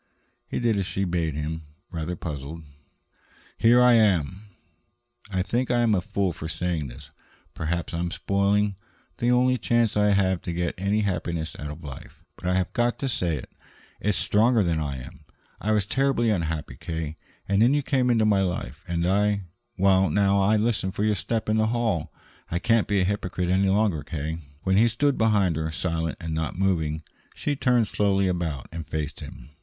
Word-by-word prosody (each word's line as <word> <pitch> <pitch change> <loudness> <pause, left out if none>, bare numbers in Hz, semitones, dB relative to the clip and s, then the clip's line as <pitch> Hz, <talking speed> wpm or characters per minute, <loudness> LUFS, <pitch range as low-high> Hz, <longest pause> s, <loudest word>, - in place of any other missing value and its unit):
He - - -3
did 115 -4 +1
as 95 - -2
she 95 - -2
bade 85 -4 -1
him, 80 +2 -3 0.3
rather 85 +1 -3
puzzled. 80 0 -6 0.9
"Here 120 +2 +5
I 125 -1 +7
am." 100 -3 +2 0.8
"I 95 -2 0
think 120 +6 -1
I 120 -1 +3
am 115 -2 +3
a 95 - +2
fool 95 -1 -1
for 80 0 -6
saying 85 -4 -2
this. 70 +4 -12 0.4
Perhaps 85 +2 -3
I 85 - -2
am 85 0 -1
spoiling 100 +2 +1 0.4
the 120 - +1
only 125 +1 +3
chance 115 0 +2
I 105 0 +4
have 95 -2 +2
to 85 - -4
get 85 0 -1
any 100 +3 0
happiness 85 -5 -2
out 75 - -5
of 75 +3 -9
life. 70 -3 -10
But 90 - -7
I 90 - +2
have 95 -1 0
got 120 0 +1
to 135 - -2
say 90 - 0
it. 65 - -9 0.5
It's 105 -2 0
stronger 110 +1 +3
than 85 -3 0
I 70 -3 -3
am. - - -12 0.4
I 110 - 0
was 105 -2 +2
terribly 135 -1 +1
unhappy, 80 -5 -2
K., 80 -2 -4 0.3
and 100 +1 +2
then 125 +5 +5
you 145 - +1
came 130 -3 +1
into 115 -3 +3
my 100 -2 +3
life, 90 -4 -3
and 85 -1 -1
I 100 +2 +2 0.3
now 100 +1 +3
I 105 +3 +4
listen 105 -3 0
for 100 +2 -2
your 105 0 +3
step 110 +3 -2
in 110 0 +2
the 110 0 +3
hall. 110 -7 0 0.4
I 85 - -1
can't 115 +3 +2
be 100 -2 +2
a - - +2
hypocrite 90 -2 -2
any 95 +1 +3
longer, 100 -5 +2
K." 80 +2 -4 0.2
When 95 0 +2
he 115 +3 +6
stood 135 +5 +1
behind 100 -7 +2
her, 80 0 -2
silent 80 -1 -2
and 80 -2 -4
not 80 +2 -2
moving, 80 -5 0 0.3
she 145 - -1
turned 125 -4 +2
slowly 100 -2 +1
about 85 -7 -2
and 80 -2 -6
faced 75 -1 -4
him. - - -10
95 Hz, 190 wpm, -25 LUFS, 80-110 Hz, 0.9 s, I